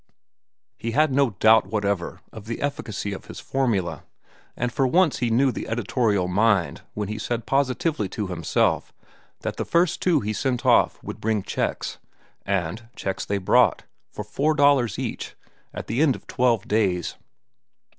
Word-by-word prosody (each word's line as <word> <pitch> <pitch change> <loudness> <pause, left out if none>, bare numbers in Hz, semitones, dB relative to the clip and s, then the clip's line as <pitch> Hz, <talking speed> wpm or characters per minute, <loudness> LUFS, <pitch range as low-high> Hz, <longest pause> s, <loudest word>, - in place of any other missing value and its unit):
He 115 0 -3
had 155 +1 +3
no 140 -1 +3
doubt 110 0 +4
whatever 100 -4 -2
of 110 -2 -10
the 115 +1 -4
efficacy 110 -8 -3
of 95 - -8
his - - -9
formula, 115 -10 -1 0.6
and 125 -1 -2
for 135 - +2
once 165 -1 +3
he 120 -3 0
knew 130 +4 +3
the - - -6
editorial 110 -4 0
mind 95 -1 +2
when 105 -1 -2
he 105 +1 -4
said 115 +1 -3
positively 135 - 0
to 105 +2 -3
himself 90 -4 0 0.5
that - - -4
the - - -1
first 170 0 +1
two 175 -5 +3
he 105 0 -2
sent 125 +2 -1
off - - +4
would - - -7
bring 110 -2 0
checks. - - -3 0.5
And 100 +4 -2
checks 95 - -3
they 100 - -1
brought, 95 - +3 0.3
for - - -6
four 155 +2 0
dollars 140 -6 +3
each, - - -5 0.4
at - - -6
the 115 +6 -1
end 150 -5 +4
of - - -12
twelve 120 -4 +1
days. 95 -6 +1
115 Hz, 165 wpm, -24 LUFS, 100-135 Hz, 0.6 s, doubt